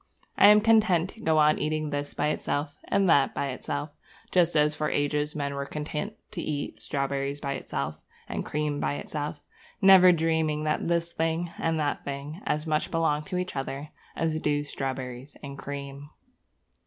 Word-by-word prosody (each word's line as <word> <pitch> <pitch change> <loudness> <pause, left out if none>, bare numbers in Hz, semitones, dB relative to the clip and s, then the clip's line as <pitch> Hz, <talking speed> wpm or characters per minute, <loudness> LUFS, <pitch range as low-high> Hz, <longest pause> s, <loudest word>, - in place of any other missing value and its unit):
I - - +7
am 210 0 +8
content 210 -6 +4
to - - -17
go 160 -5 +2
on 150 0 +5
eating 155 -1 -1
this 145 0 -3
by 150 - +1
itself 145 -1 -2
and 200 -1 +2
that 140 -5 +4
by 140 - -1
itself, 145 +3 -4 0.4
just 175 -2 +3
as 150 0 +4
for 150 0 -1
ages 150 +1 0
men 140 -1 -2
were 140 0 -4
content 150 +8 -4 0.2
to 185 -5 -4
eat 145 -3 -4
strawberries 140 0 -2
by 140 -1 -2
themselves - - -4 0.3
and - - -3
cream 150 -1 -2
by - - 0
itself, 145 0 -4 0.4
never 190 -1 +8
dreaming 160 -2 +1
that 155 +1 0
this 170 0 0
thing 165 +1 -1
and 165 -1 0
that 145 -1 -1
thing 145 +5 -6
as 150 +1 0
much 155 -1 0
belong 155 -2 +1
to 180 - -3
each 180 -3 -3
other 135 +2 -4 0.3
as 160 -1 0
do 145 -1 0
strawberries 130 -1 -5
and 140 0 -7
cream. 140 0 -7
150 Hz, 175 wpm, -27 LUFS, 145-165 Hz, 0.4 s, am